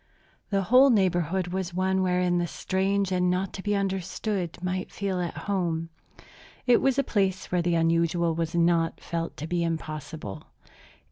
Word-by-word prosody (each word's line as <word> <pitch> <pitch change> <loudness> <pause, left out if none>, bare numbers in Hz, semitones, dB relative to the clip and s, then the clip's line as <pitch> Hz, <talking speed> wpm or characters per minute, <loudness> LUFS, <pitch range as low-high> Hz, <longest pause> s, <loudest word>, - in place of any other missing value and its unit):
The 195 -1 +1
whole 255 +8 +6
neighborhood 185 - +1
was 185 -1 -3
one 190 +1 +1
wherein 180 -1 +2
the 175 - 0
strange 195 +2 0
and 180 -1 +2
the 180 - +2
not 190 +1 -3
to 190 - -6
be 205 +1 0
understood 195 -1 -2
might 185 +1 -3
feel 195 -2 -2
at 175 -1 -3
home. 170 -5 -1 0.8
It 245 -2 +5
was 270 -1 +2
a 275 - +3
place 195 -6 -1
where 180 -1 +2
the 170 0 +1
unusual 165 +1 +2
was 165 +1 -2
not 170 -1 +2
felt 165 -1 -4
to 155 - -5
be 170 +1 -1
impossible. 155 - -5
180 Hz, 165 wpm, -27 LUFS, 170-195 Hz, 0.8 s, whole